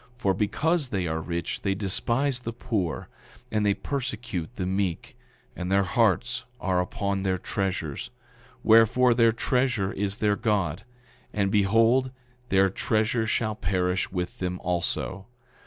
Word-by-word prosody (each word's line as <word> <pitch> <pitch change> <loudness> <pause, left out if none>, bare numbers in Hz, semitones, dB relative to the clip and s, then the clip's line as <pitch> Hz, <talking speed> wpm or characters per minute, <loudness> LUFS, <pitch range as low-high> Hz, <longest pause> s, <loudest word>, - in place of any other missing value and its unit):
For 100 -6 +1
because 140 - 0
they 95 -5 -1
are 80 -1 -2
rich 85 +1 -3
they 95 -1 0
despise 120 +7 0
the 115 -1 -5
poor, 105 - -2 0.4
and 105 -1 +1
they 100 -1 +3
persecute 120 - -4
the 95 - -2
meek, 95 -2 -2 0.4
and 90 +1 -4
their 100 0 +4
hearts 120 +5 +1 0.2
are 90 -1 +1
upon 100 +2 -2
their 95 -1 0
treasures; 90 -6 -3 0.5
wherefore, 115 +3 +6
their 115 -1 +5
treasure 120 -4 0
is 100 +1 -2
their 105 -2 +2
God. 100 -3 -1 0.5
And 100 -2 +1
behold, 115 +6 +4 0.4
their 95 0 +5
treasure 110 +3 0
shall 110 -1 0
perish 90 -2 -1
with 90 -2 -4
them 90 0 -2
also. 90 +2 -2
100 Hz, 140 wpm, -26 LUFS, 95-115 Hz, 0.5 s, wherefore